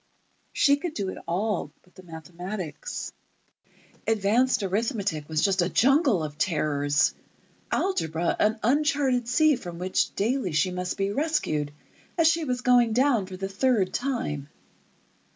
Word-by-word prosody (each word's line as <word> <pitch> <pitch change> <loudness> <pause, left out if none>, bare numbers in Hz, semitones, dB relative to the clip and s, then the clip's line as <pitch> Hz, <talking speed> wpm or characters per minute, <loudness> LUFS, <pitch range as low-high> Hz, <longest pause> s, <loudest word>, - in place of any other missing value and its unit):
She 280 0 +3
could 310 +2 -5
do 195 -3 -2
it - - -7
all 185 -3 -1
but 180 - -26
the 185 - -13
mathematics. 180 - -7 0.9
Advanced 225 +3 +2
arithmetic 195 - -2
was 155 -1 0
just 195 -2 +3
a 175 - +1
jungle 270 - +3
of 150 -1 -6
terrors, 145 -4 +1 0.6
algebra 170 - 0
an 215 +2 +2
uncharted 275 -1 +2
sea 305 +4 +4
from 175 -8 -8
which 185 +2 -1
daily 220 - 0
she 180 +4 +2
must 180 0 -3
be 195 0 0
rescued 205 - -1 0.5
as 330 -2 +5
she 330 0 +2
was 250 -2 -2
going 245 -3 +4
down 245 -5 +2
for 185 -1 -8
the 195 +1 -3
third 200 -1 +1
time. 150 - -2
200 Hz, 140 wpm, -26 LUFS, 175-255 Hz, 0.9 s, as